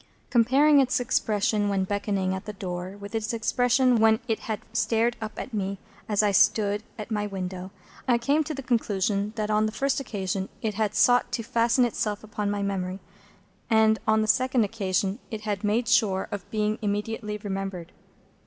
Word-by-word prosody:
Comparing 270 +5 +5
its 270 +1 +2
expression 215 -4 +1
when 195 -1 +1
beckoning 200 -1 -1
at 190 - -5
the 210 - -6
door 185 0 -5
with 200 +2 -9
its 225 +1 -2
expression 245 +2 +2
when 220 0 +5
it 225 -2 0
had 220 -2 -4
stared 230 +1 +1
up 220 -1 -6
at 255 - -6
me 200 -1 -2 0.3
as 210 0 +2
I 205 - +3
stood 205 +1 +3 0.2
at 215 +1 -7
my 210 -1 -1
window, 185 -1 -5 0.4
I 245 -2 +4
came 280 +6 +1
to 310 - -4
the 275 - -6
conclusion 205 -4 0
that 215 -1 -2
on 215 +1 +3
the - - -3
first 275 +5 0
occasion 195 -6 -3
it 220 -1 -2
had 210 0 -1
sought 245 0 +4
to 230 - -1
fasten 235 +2 +2
itself 210 -3 -2
upon 210 -1 -3
my 205 0 -1
memory, 190 -1 -2 0.7
and 220 -1 +4
that - - -19
on 220 0 +4
the - - -2
second 255 +1 +3
occasion 200 0 -1
it 220 -2 -5
had 210 -1 -3
made 215 +3 +1
sure 210 -3 +2
of 200 -3 -6
being 215 0 -1
immediately 210 +1 -2
remembered. 195 -4 -5
215 Hz, 185 wpm, -26 LUFS, 200-230 Hz, 0.7 s, Comparing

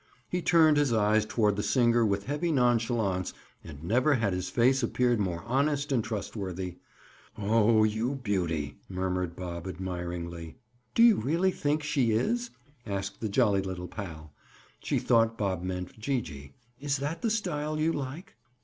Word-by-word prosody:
He 180 - -2
turned 160 -3 +5
his 145 -4 +2
eyes 110 -1 +3
toward 105 -2 +1
the - - 0
singer 120 +1 +3
with 100 -2 0
heavy 150 +5 -1
nonchalance 115 - +1 0.3
and 75 -1 -10
never 125 - +3
had 110 -6 0
his 90 0 -3
face 130 +3 +3
appeared 120 0 +1
more 90 -4 -2
honest 140 +3 0
and 120 -5 +2
trustworthy. 95 -4 -5 0.6
"Oh, 110 +1 +3
you 110 +5 0
beauty!" 90 - -2
murmured 90 -2 -2
Bob 85 -1 -6
admiringly. 85 -2 -5 0.4
"Do 230 - +6
you 235 -3 +7
really 165 - +1
think 150 -2 -1
she 135 -6 +1
is?" 235 - 0 0.3
asked 100 -2 -4
the 110 - -1
jolly 100 0 +3
little 90 -2 -5
pal. 80 -8 -8 0.5
She - - -1
thought 115 -1 +2
Bob 95 -4 -1
meant 90 +2 -5
Gee 130 +3 0
gee. 70 -6 -10 0.3
"Is 140 0 -1
that 145 +4 -4
the 230 - +1
style 155 -8 -2
you 160 +2 +2
like?" 145 +6 -6
110 Hz, 160 wpm, -29 LUFS, 95-140 Hz, 0.6 s, you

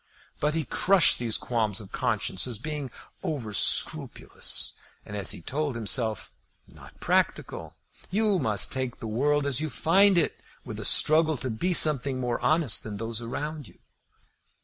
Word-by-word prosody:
But 150 +1 -1
he 160 -2 -2
crushed 185 +7 +3
these 115 -3 +1
qualms 110 -5 -1
of 100 -3 -9
conscience 110 -4 -1
as 120 -3 -5
being 150 +2 -5 0.3
over 120 -9 -5
scrupulous, - - +1 0.3
and, 105 - -8
as 100 -3 -2
he 85 - -5
told 145 - -3
himself, 110 -1 -1 0.4
not - - -16
practical. - - -2 0.3
You 205 -1 +1
must 110 - +1
take 130 -2 -4
the - - -8
world 140 +6 0
as 140 0 +1
you 155 - -3
find 195 +5 +3
it, 165 - 0 0.2
with - - -7
a - - -5
struggle 155 0 +4
to 130 0 -5
be 170 +12 -2
something 140 -5 +5
more 120 -2 -2
honest 155 -8 +2
than 105 -2 -7
those 115 +1 -4
around 145 +4 -6
you. - - -19
130 Hz, 160 wpm, -26 LUFS, 115-155 Hz, 0.4 s, something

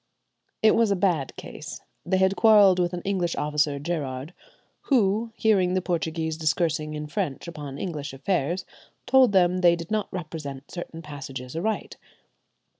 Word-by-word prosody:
It 220 - +7
was 230 -2 +3
a 200 - +2
bad 175 -8 0
case. - - -8 0.3
They 190 +1 +2
had 190 +1 +3
quarrelled 205 -5 +6
with 175 -1 +1
an 175 - -4
English 185 -4 -1
officer, 150 -1 0
Gerard, 145 -1 -4 0.5
who, 225 -3 +2
hearing 190 -5 +2
the - - +3
Portuguese 160 -2 -2
discoursing 155 -1 0
in 150 0 -4
French 155 -2 -3
upon 145 -5 -7
English 150 -4 -4
affairs, 175 +4 -1 0.4
told 260 -2 +5
them 180 -2 +3
they 175 -1 +5
did 170 +1 -8
not 215 -1 -1
represent 155 -6 -6
certain 165 -2 -7
passages 135 -3 -7
aright. 215 +7 -2
170 Hz, 150 wpm, -25 LUFS, 150-190 Hz, 0.5 s, It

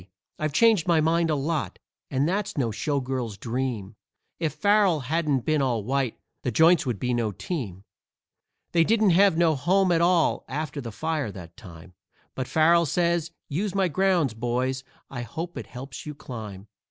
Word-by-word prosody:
I've 155 -1 -1
changed 215 +1 +4
my 170 -2 +4
mind 165 +1 +2
a 155 - +2
lot, 150 +2 -2 0.3
and 140 +2 +1
that's 195 0 -2
no 120 -5 0
showgirl's 130 -3 -2
dream; 115 -3 -3 0.4
If 160 -4 -1
Farrell 200 -6 +3
hadn't 150 0 0
been 155 -2 +2
all 120 -5 0
white, 130 0 -1 0.2
the - - -1
Joints 160 +5 +4
would 120 -4 -1
be 125 0 -1
no 115 -3 0
team. 100 - -5 0.9
They 165 -1 +4
didn't 215 +1 +3
have 190 -1 +5
no 165 -2 +4
home 180 +6 +2
at 165 -1 +3
all 170 -1 +3
after 150 +1 -4
the 115 -3 -6
fire 155 -1 -2
that 85 -3 -11
time, 90 -1 -13 0.4
But 130 -1 -4
Farrell 170 +1 +4
says, 170 +1 +1 0.2
"Use 190 +6 -2
my 190 -2 +2
grounds, 175 - +2
boys; 125 +3 -2 0.3
I 125 -3 -4
hope 165 +8 -6
it - - -6
helps 130 +2 -9
you 150 - -6
climb." 105 -8 -8
150 Hz, 170 wpm, -25 LUFS, 125-170 Hz, 0.9 s, have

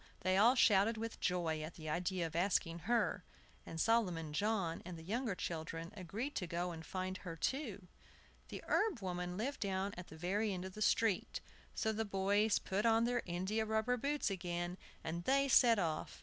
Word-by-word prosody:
They 185 0 +2
all 230 +6 +6
shouted 220 -1 +5
with 225 +1 -5
joy 170 -4 0
at 155 +2 -6
the 155 -2 -8
idea 180 +3 -1
of 165 0 -6
asking 170 -2 +1
her, 240 - +2 0.4
and 165 - -5
Solomon 180 -8 +1
John 195 -2 0
and 175 -1 -7
the 160 - -10
younger 225 +3 -1
children 165 0 -4
agreed 210 - -4
to 180 - -2
go 175 +1 -2
and 160 -1 -7
find 185 +2 -3
her 180 -3 -7
too. 210 - -2 0.6
The - - -7
herb 410 - +1
woman 180 -1 -3
lived 265 +7 -2
down 195 0 -1
at 175 0 -8
the 160 - -11
very 200 +6 0
end 185 0 -4
of 190 - -7
the 215 - -8
street; 215 -2 +2 0.4
so 220 - +1
the 220 +1 -1
boys 205 +1 +2
put 195 +2 -1
on 225 0 +4
their 240 0 +1
india 190 +6 -1
rubber 220 +3 +1
boots 280 -1 0
again, 175 -1 -3 0.3
and 170 +2 -3
they 275 +1 +3
set 240 -3 +6
off. 165 -5 -2
190 Hz, 190 wpm, -37 LUFS, 175-225 Hz, 0.6 s, all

